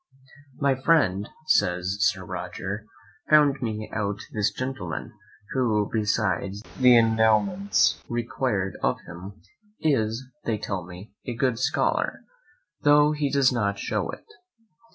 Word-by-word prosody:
My 140 -1 +3
friend, 130 - +2 0.2
says 90 - +1
Sir 100 -1 +1
Roger, 100 +3 -5 0.4
found 145 -3 +5
me 110 -3 -3
out 105 -2 -1 0.2
this 105 -2 +1
gentleman, 130 -2 -5 0.4
who, 115 -7 +1
besides 105 -2 0 0.2
the 125 -2 +7
endowments 115 - +3
required 120 -4 -2
of - - +1
him, 90 +4 -10 0.4
is, 125 -6 +1 0.2
they 110 -2 -1
tell 95 -4 -4
me, 90 +4 -11
a 120 - -3
good 125 -1 0
scholar, 130 - 0 0.6
tho' 150 0 +5
he 150 -2 -1
does 140 -1 +4
not 100 -4 0
shew - - -2
it. - - -8
110 Hz, 120 wpm, -25 LUFS, 100-135 Hz, 0.6 s, the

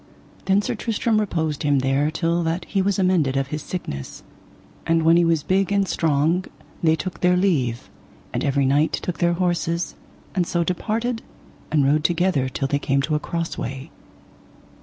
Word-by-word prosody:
Then 195 +2 +3
Sir - - -1
Tristram 225 -1 0
reposed 160 -8 -1
him 145 -2 +2
there 135 +3 +1
till 165 +1 0
that 165 +2 -2
he 195 - 0
was 195 0 +1
amended 175 -8 +2
of 135 0 -1
his 150 +1 -4
sickness; 70 - -6 0.6
and 165 0 +3
when 165 +1 +5
he 175 - +5
was 165 -3 +2
big 195 +3 +1
and 200 -1 +2
strong 160 +3 +1 0.4
they 160 -1 +4
took 185 +3 -5
their 180 0 +3
leave, 140 -11 0 0.5
and - - -1
every 140 -1 +2
knight 145 +4 +2
took 180 - -3
their 175 -1 +3
horses, 170 -2 -1 0.4
and 180 -3 0
so 170 -1 +1
departed 225 +7 -2 0.5
and 145 -3 +3
rode 150 +2 +3
together 170 -6 +1
till 135 +1 -2
they 145 +1 0
came 140 0 +1
to 155 - -1
a 150 - +2
cross 165 +1 -4
way. 135 +1 -5
165 Hz, 180 wpm, -22 LUFS, 145-180 Hz, 0.6 s, when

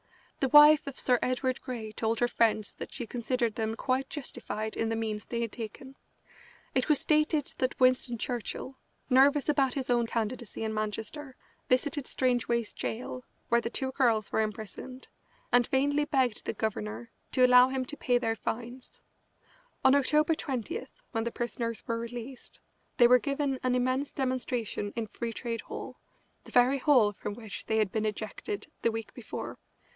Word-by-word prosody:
The 270 - +1
wife 295 +1 +8
of 280 - -6
Sir 250 -2 +3
Edward 255 0 0
Grey 235 -5 -5
told 220 +1 -1
her 240 - +3
friends 220 -3 +1
that - - -8
she 245 - -5
considered 235 0 -1
them 220 0 -2
quite 265 +3 -1
justified 230 -6 -5
in 225 - 0
the 225 - 0
means 220 -2 -3
they 235 -1 -2
had 230 -2 -2
taken. 250 +4 -8 0.8
It 260 +2 +1
was 300 - +5
stated 305 -1 +1
that 255 0 -1
Winston 255 -1 +3
Churchill, 250 +3 -4 0.3
nervous 275 +2 +5
about 275 -4 +2
his 265 -2 -2
own 240 -1 +2
candidacy 230 0 -3
in 220 0 -2
Manchester, 220 +6 -4 0.3
visited 275 +2 +1
Strangeways 240 -3 0
Gaol, 250 +2 -4 0.3
where 235 0 +4
the 230 - -3
two 265 +2 -2
girls 230 -6 +2
were - - +2
imprisoned, 220 +4 -6 0.4
and 245 -1 +5
vainly 285 +2 +2
begged 260 -6 +1
the - - -2
governor 115 - -3 0.2
to 255 - +6
allow 250 0 +8
him 260 -1 -2
to 300 - -7
pay 245 -4 +2
their 225 -2 0
fines. 240 +3 -6 0.8
On 265 - +7
October 300 +3 +3
20, 260 -9 -3 0.3
when 225 -2 -1
the 235 - -2
prisoners 230 -1 -3
were 230 0 -1
released, 240 +2 -7 0.4
they 240 - +8
were 250 +1 +7
given 275 -1 -1
an 255 -1 +1
immense 255 +3 0
demonstration 250 -5 -2
in 230 -1 -2
Free 230 +2 -5
Trade 230 -2 -4
Hall, - - -8 0.5
the - - -12
very 250 +3 +4
hall 250 -8 +4
from 205 - -5
which 220 -3 -8
they 220 - +1
had 215 -3 +2
been 220 -1 0
ejected 215 - -4 0.2
the 230 - +2
week 225 0 -6
before. - - -7
245 Hz, 170 wpm, -29 LUFS, 225-265 Hz, 0.8 s, wife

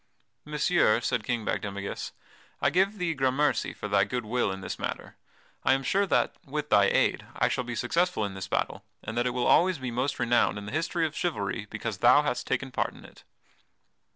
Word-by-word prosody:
"Messire," 150 -6 +3
said 120 -2 -1
King 120 -2 -2
Bagdemagus, 100 -1 -3 0.5
"I - - +2
give 195 +4 +2
thee 175 -3 0
grammercy 135 +1 +1
for - - -6
thy 100 -1 +3
good 120 +3 -3
will 120 -1 0
in 95 0 -6
this - - -5
matter. - - -5 0.5
I 130 - +4
am 135 0 0
sure 200 +7 +1
that, - - +1
with 150 -1 -4
thy 100 -1 +6
aid, - - +1
I - - +2
shall 125 - -1
be 120 -1 -5
successful 170 +1 0
in 100 - -5
this 95 0 -6
battle, - - -2 0.2
and 110 - -5
that 120 +1 +1
it 125 - -1
will 125 - 0
always 180 +1 +4
be 130 -2 -4
most 125 +4 -1
renowned 120 -2 +2
in 100 - -7
the 105 - -6
history 165 +2 0
of 155 -1 -4
chivalry 105 - -2
because 110 -5 -4
thou 125 +6 +6
hast 145 -4 -2
taken 130 +1 -1
part - - -1
in - - -14
it." - - -16
125 Hz, 210 wpm, -28 LUFS, 105-150 Hz, 0.5 s, thy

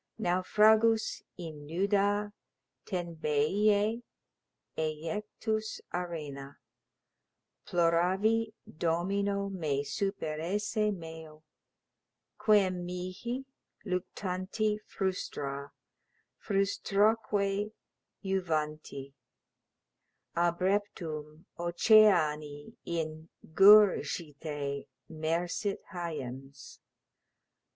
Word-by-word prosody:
Naufragus 220 +4 +3 0.2
in 155 -5 -8
nuda 200 +4 +1 0.5
Tenbeiæ[K] 190 +6 +1 0.7
ejectus 210 +8 -3
arena, 150 -6 -5 1.1
Ploravi 185 +7 +2 0.3
domino 200 +4 0
me 155 -7 -1
superesse 200 +5 -1
meo, 160 -4 -9 1.0
Quem 190 -4 +3
mihi, 185 +9 -4 0.4
luctanti 185 +3 -2
frustra, 140 -7 -3 0.7
frustraque 200 0 +1 0.5
juvanti, 155 -7 -2 1.2
Abreptum, 170 -3 -1
oceani 170 -6 +3
in 160 -1 -4 0.2
gurgite 155 -8 +4 0.2
mersit 170 +6 -1
hyems. 135 -6 -6
180 Hz, 50 wpm, -31 LUFS, 155-205 Hz, 1.2 s, gurgite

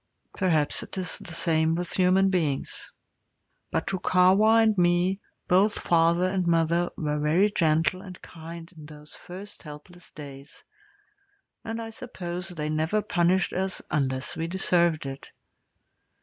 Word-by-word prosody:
Perhaps 160 -6 +1
it - - -8
is 185 -2 -2
the - - -9
same 160 -1 +2
with 175 +1 -4
human 190 +1 +3
beings. 155 -7 -2 0.8
But - - -1
to 190 - -2
Kahwa 200 +6 +4
and 220 -1 +3
me 180 +1 +2 0.3
both 195 +4 +3
father 170 +1 +2
and 185 -2 -1
mother 170 +1 +2
were 150 -1 -2
very 170 +8 +2
gentle 165 +1 +1
and 185 -3 -11
kind 165 0 -10
in 155 -2 -12
those 150 0 -12
first 195 +3 -10
helpless 165 +3 -12
days, 140 -1 -12 1.0
and 225 0 -5
I 225 -1 -6
suppose 180 -6 -6
they 155 -4 -4
never 160 +7 0
punished 175 +2 +1
us 190 +1 -1
unless 130 -3 0
we 165 - -3
deserved 170 -3 +1
it. 135 0 -7
175 Hz, 140 wpm, -26 LUFS, 160-190 Hz, 1.0 s, Kahwa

